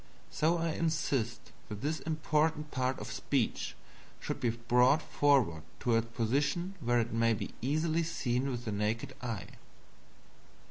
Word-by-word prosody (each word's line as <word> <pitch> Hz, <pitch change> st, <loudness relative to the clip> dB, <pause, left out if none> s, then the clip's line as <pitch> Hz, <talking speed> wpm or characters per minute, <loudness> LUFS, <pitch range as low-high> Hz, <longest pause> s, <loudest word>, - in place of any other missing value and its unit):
So 165 Hz, +3 st, +2 dB
I 165 Hz, -1 st, 0 dB
insist 145 Hz, -8 st, -1 dB, 0.2 s
that 105 Hz, -1 st, -6 dB
this 155 Hz, +3 st, -1 dB
important 155 Hz, -1 st, 0 dB
part 130 Hz, 0 st, 0 dB
of -, -, -6 dB
speech -, -, -1 dB, 0.4 s
should -, -, -4 dB
be 120 Hz, -, +1 dB
brought 125 Hz, +5 st, +4 dB
forward 135 Hz, -, +2 dB, 0.2 s
to 120 Hz, -2 st, +2 dB
a 115 Hz, -, +4 dB
position 140 Hz, -, 0 dB
where 120 Hz, 0 st, +2 dB
it 115 Hz, 0 st, -1 dB
may 115 Hz, 0 st, +3 dB
be -, -, -5 dB
easily 155 Hz, +6 st, +1 dB
seen 135 Hz, -5 st, -1 dB
with 120 Hz, -1 st, -4 dB
the 110 Hz, -, -2 dB
naked 105 Hz, +3 st, -1 dB
eye. 115 Hz, -7 st, -3 dB
130 Hz, 145 wpm, -32 LUFS, 115-155 Hz, 0.4 s, brought